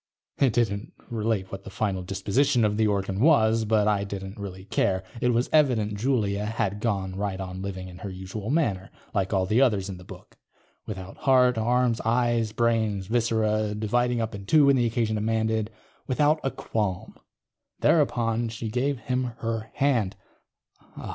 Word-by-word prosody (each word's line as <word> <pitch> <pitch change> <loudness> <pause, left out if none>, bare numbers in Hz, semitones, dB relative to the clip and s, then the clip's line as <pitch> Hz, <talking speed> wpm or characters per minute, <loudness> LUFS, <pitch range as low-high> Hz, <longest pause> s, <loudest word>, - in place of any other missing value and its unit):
_ - - +3
It 130 -5 +3
didn't 105 -3 -1 0.2
relate 110 -4 -1
what 95 0 -7
the - - -9
final 95 -1 -2
disposition 110 +6 +1
of 105 0 +1
the 110 -1 +3
organ 100 -1 -1
was, 115 -6 +4
but 105 -1 +2
I 105 -2 +2
didn't 100 +1 -6
really 95 -2 -7
care. 95 -1 0 0.2
It 125 - +2
was 120 +1 +2
evident 125 -9 +3
Julia 105 -3 0
had 105 -2 -2
gone 100 -4 -1
right 100 -1 -3
on 95 -1 -6
living 95 -1 -5
in 90 0 -11
her 100 - -6
usual 95 +3 -6
manner, 115 - 0 0.2
like 95 -2 0
all 95 -2 +2
the 110 +7 +2
others 105 -7 +2
in 95 - -6
the 90 - -12
book. - - -13 0.5
Without 95 -2 -7
heart, 125 -2 +4
arms, 120 +1 +1
eyes, 115 -1 +1
brains, 110 -4 0
viscera, 110 -1 +1
dividing 120 +3 0
up 115 0 -3
in 100 -1 -8
two 150 +3 +6
when 140 0 +5
the 120 -2 +2
occasion 115 -1 0
demanded. 110 0 0 0.4
Without 150 +4 +2
a 135 - +1
qualm. 105 -6 -3
_... - - -30 0.6
thereupon 120 -7 +2
she 115 0 -5
gave 130 +5 0
him 125 +2 -1 0.2
her 115 -1 -3
hand. 125 -9 +1
110 Hz, 175 wpm, -26 LUFS, 100-120 Hz, 0.6 s, two